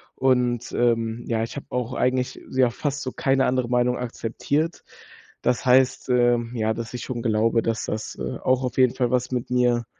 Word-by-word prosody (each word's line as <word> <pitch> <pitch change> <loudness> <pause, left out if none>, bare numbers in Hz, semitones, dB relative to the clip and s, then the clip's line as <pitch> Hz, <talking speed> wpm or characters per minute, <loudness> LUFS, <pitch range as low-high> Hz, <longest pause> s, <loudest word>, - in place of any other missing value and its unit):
und, 125 -2 +1
ähm, 115 -1 +1
ja, 115 -1 +1
ich 115 - -6
habe 140 - -7
auch 125 0 -2
eigentlich, 125 0 0
ja, 130 -1 +3
fast 145 +2 -3
so 130 - -4
keine 135 -1 +2
andere 125 -2 0
Meinung 125 0 +2
akzeptiert. 125 +7 -2 0.6
Das 125 +1 0
heißt, 130 +1 +3
ähm, 120 -1 +2
ja, 110 -1 0
dass 115 +1 -6
ich 125 - -5
schon 120 -3 -4
glaube, 115 0 +2
dass 115 -1 -2
das, 110 0 -4
äh, - - -3
auch 130 0 +2
auf 125 - -4
jeden 130 -2 +4
Fall 125 -2 0
was 125 0 0
mit 125 -1 -2
mir 125 -1 +2
125 Hz, 190 wpm, -24 LUFS, 115-130 Hz, 0.6 s, jeden